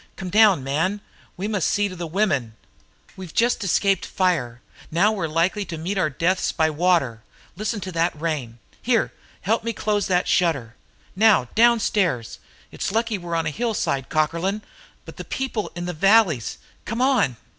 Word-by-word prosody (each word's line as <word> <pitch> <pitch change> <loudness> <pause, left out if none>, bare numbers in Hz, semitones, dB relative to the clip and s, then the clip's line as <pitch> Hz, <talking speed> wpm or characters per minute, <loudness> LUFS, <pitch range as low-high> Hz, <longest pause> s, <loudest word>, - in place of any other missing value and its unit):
Come 185 -2 -6
down, 205 -8 +5
man; 160 +9 -1 0.4
we 195 +3 -3
must 205 -5 0
see 205 0 +1
to 185 - -8
the 175 -1 -5
women! 155 - 0 0.6
We've 185 -4 -10
just 235 -1 +2
escaped 195 0 +2
from - - -10
fire; 145 -11 0 0.3
now 185 +7 +3
we're 190 -7 -2
likely 170 +6 0
to 165 - -6
meet 175 +6 -3
our 155 - +2
deaths 175 +6 0
by 160 -1 +1
water. 155 -8 +1 0.3
Listen 215 +3 -3
to 190 - -5
that 165 -2 0
rain, 145 -8 -3 0.2
Here, 235 -2 +1 0.3
help 225 +3 0
me 230 0 -2
to - - -15
close 210 -1 0
that 180 -1 +1
shutter. 135 -10 +1 0.4
Now, 200 - +4
downstairs! 210 - +2 0.3
It's - - -3
lucky 225 -1 0
we're 170 -1 -4
on 165 - 0
a - - -1
hillside, 210 - -2
Cockerlyne! 170 +7 0 0.4
But - - -11
the - - -6
people 255 -5 -3
in 175 0 -4
the 180 - -3
valleys! 180 - +3 0.3
Come 230 +2 -4
on!" 260 - +2
185 Hz, 175 wpm, -23 LUFS, 160-210 Hz, 0.6 s, down